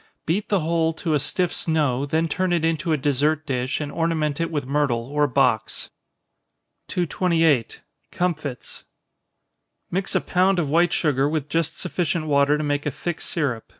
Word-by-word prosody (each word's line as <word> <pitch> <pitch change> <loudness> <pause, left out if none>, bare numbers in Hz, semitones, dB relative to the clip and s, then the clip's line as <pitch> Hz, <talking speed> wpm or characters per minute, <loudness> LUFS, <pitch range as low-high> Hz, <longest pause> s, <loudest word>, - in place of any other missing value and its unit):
Beat 195 +6 -1
the 200 -4 +2
whole 165 0 +1
to 160 0 -2
a 150 - +3
stiff 180 +5 -1
snow, 145 -5 0
then 160 +3 +1
turn 185 +3 -1
it 170 -2 +1
into 165 +1 0
a 155 - +3
dessert 145 +2 +1
dish, 130 -2 -1
and 145 -1 -4
ornament 160 -2 -1
it 165 - 0
with 145 -5 -2
myrtle 135 -4 0
or 145 +3 +1
box. 125 -5 0 1.0
228. 165 -7 +1 0.3
Comfits. 155 -8 -3 1.1
Mix 190 +2 -1
a - - +3
pound 185 +1 +2
of 155 -5 0
white 170 +2 +3
sugar 140 -3 +1
with 150 -2 -2
just 165 0 -1
sufficient 170 -3 -1
water 145 0 +3
to 155 - -3
make 145 0 -1
a - - +2
thick 160 +4 -4
syrup. 135 -9 -2
155 Hz, 165 wpm, -23 LUFS, 140-165 Hz, 1.1 s, a